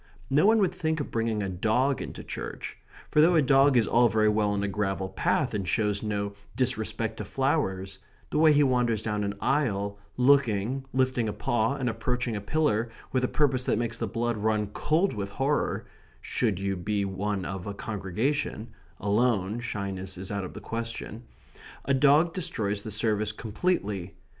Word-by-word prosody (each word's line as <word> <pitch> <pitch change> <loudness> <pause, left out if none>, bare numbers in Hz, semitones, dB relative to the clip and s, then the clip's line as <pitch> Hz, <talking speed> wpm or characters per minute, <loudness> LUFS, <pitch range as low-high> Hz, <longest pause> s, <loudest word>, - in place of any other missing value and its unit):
No 150 +8 +5
one 225 +1 +6
would 190 -4 +2
think 160 -3 -1
of 145 - -4
bringing 115 -2 0
a - - -2
dog 110 +9 +1
into - - -7
church. - - -6 0.4
For 150 - +5
though 170 +3 +5
a 160 - +6
dog 135 0 +5
is 115 - +4
all 120 +3 +4
very 110 -1 +3
well 105 -1 +2
on 100 -1 -1
a - - 0
gravel 95 -1 -2
path, - - 0
and 100 -3 -2
shows 105 +2 +1
no 100 -1 -2 0.2
disrespect 115 -3 -1
to - - -4
flowers, 130 -10 -1 0.3
the 150 - +1
way 160 0 +7
he 145 0 +5
wanders 120 -5 +1
down 105 -2 -1
an 100 0 -2
aisle, 100 -8 0 0.2
looking, 130 -2 +3
lifting 130 -3 +1
a - - -3
paw, 120 -1 0
and 130 -3 -2
approaching 120 +1 -1
a 100 - -3
pillar 120 -2 +1 0.2
with 130 -1 +1
a - - +3
purpose 130 -3 +1
that - - +1
makes 115 -1 -2
the 115 - -1
blood 115 +2 -1
run 105 -1 0
cold 165 +6 +1
with 100 -2 -4
horror 135 +7 -1 0.3
(should 110 -7 -1
you 100 0 -1
be 100 +3 -1
one 95 0 -2
of 95 -1 -5
a 100 - -3
congregation 110 +5 -2 0.3
alone, 105 0 +1
shyness 100 -5 -4
is 95 +2 -5
out 100 -1 -2
of 90 - -7
the - - -7
question), 115 0 -5 0.6
a 140 - +2
dog 145 +5 +4
destroys 105 - -1
the 110 - -7
service 110 0 +1
completely. 105 - -2
110 Hz, 180 wpm, -27 LUFS, 100-130 Hz, 0.6 s, way